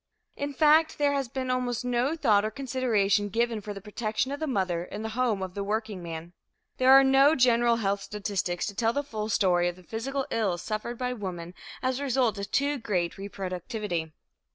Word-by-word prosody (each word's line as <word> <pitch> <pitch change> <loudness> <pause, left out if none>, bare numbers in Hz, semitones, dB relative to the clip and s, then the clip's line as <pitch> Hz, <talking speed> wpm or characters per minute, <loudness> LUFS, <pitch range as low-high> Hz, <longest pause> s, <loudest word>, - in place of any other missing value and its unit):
In 285 0 -3
fact 310 +3 +4
there 285 -1 +2
has 275 -2 -1
been 255 +1 -3
almost 250 -1 -1
no 250 +5 +1
thought 215 -10 +3
or 215 - 0
consideration 220 -6 +1
given 230 +1 0
for 210 - -6
the 200 -1 -7
protection 215 +5 -2
of 285 - -4
the 315 - -2
mother 185 - 0
in 205 +4 -7
the 220 - -3
home 230 -5 0
of 185 -1 -6
the 200 - -3
workingman. 185 -6 -4 0.4
There 260 +1 +5
are 270 0 +9
no 270 +3 +5
general 240 -2 +4
health 200 -3 -1
statistics 195 -4 -2
to 205 - -4
tell 225 +2 +1
the 285 - -1
full 215 -6 -4
story 180 -4 +3
of 175 - -2
the 185 - -16
physical 265 +7 -3
ills 195 -6 0
suffered 220 +2 -4
by 250 0 -2
women 180 -6 -6 0.3
as 255 0 0
a - - -3
result 250 -6 +1
of 200 0 -5
too 280 +2 +1
great 180 -7 -1
reproductivity. 190 -2 -4
220 Hz, 200 wpm, -27 LUFS, 195-260 Hz, 0.4 s, are